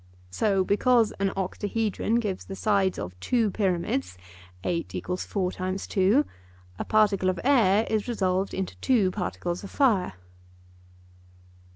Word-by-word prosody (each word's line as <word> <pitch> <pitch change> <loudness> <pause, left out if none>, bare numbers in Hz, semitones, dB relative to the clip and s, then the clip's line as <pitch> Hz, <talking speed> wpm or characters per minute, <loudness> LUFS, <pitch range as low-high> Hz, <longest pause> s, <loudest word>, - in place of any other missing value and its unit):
So 195 - +1
because 225 +3 +3
an 195 0 +2
octahedron 205 +3 -1
gives 210 -6 -1
the 195 - -7
sides 195 -2 +1
of 90 - -5
two 230 - +1
pyramids 170 - -1 0.5
(8 170 -1 -2 0.2
= 180 - 0
4 185 -3 -2
x 185 +1 -2
2), 205 +10 +3 0.5
a - - -3
particle 205 -3 +3
of 185 - -2
air 225 -6 +4
is 215 0 -1
resolved 190 -4 0
into 190 -1 -3
two 220 -8 +2
particles 180 -2 -3
of 200 - -7
fire. 220 - +2
195 Hz, 135 wpm, -26 LUFS, 185-220 Hz, 0.5 s, air